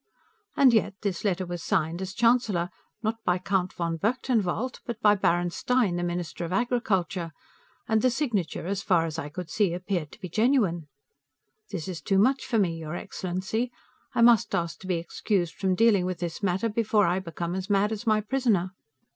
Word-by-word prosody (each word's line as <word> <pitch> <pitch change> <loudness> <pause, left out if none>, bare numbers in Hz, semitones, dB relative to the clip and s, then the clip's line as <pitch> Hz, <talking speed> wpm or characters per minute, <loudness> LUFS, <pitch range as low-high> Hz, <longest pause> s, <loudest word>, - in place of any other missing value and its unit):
and 265 -3 +6
yet, 215 -3 +2
this 195 -4 -2
letter 190 -3 0
was 175 -1 -5
signed, 160 +4 0
as 190 +1 -5
Chancellor, 230 -7 +2 0.3
not 220 +1 0
by 180 0 +2
Count 185 0 0
von 170 -1 -2
Berchtenwald, 235 +2 0
but 235 -2 -5
by 210 -2 +5
Baron 175 -3 +1
Stein, 245 -3 +1
the 175 - -1
Minister 175 -2 -3
of 170 - -4
Agriculture, 190 -7 0 0.6
and 220 -1 +2
the 255 - +4
signature, 230 - -1
as 195 +2 -2
far 170 -4 +2
as 160 0 -4
I 150 - -5
could 175 +2 -7
see, 195 -5 +1
appeared 180 -4 -3
to - - -14
be 185 - -6
genuine! 205 - +1 0.8
This 190 -5 -5
is 175 -4 -5
too 195 - +1
much 260 +7 +3
for 235 - +1
me, 180 -6 +2
your 160 +1 -5
excellency; 190 +8 -3 0.4
I 235 - +4
must 235 -3 +5
ask 170 -1 -2
to 190 - -10
be 185 - +1
excused 175 +1 -1
from 190 -1 0
dealing 205 -4 +4
with 185 -1 -3
this 175 +1 -4
matter, 195 +2 +1
before 215 -1 +2
I 175 +2 +1
become 170 -1 -4
as 190 +1 -4
mad 205 +1 +2
as 220 +2 -5
my 215 -1 +4
prisoner! 210 -6 +1
190 Hz, 190 wpm, -27 LUFS, 175-220 Hz, 0.8 s, and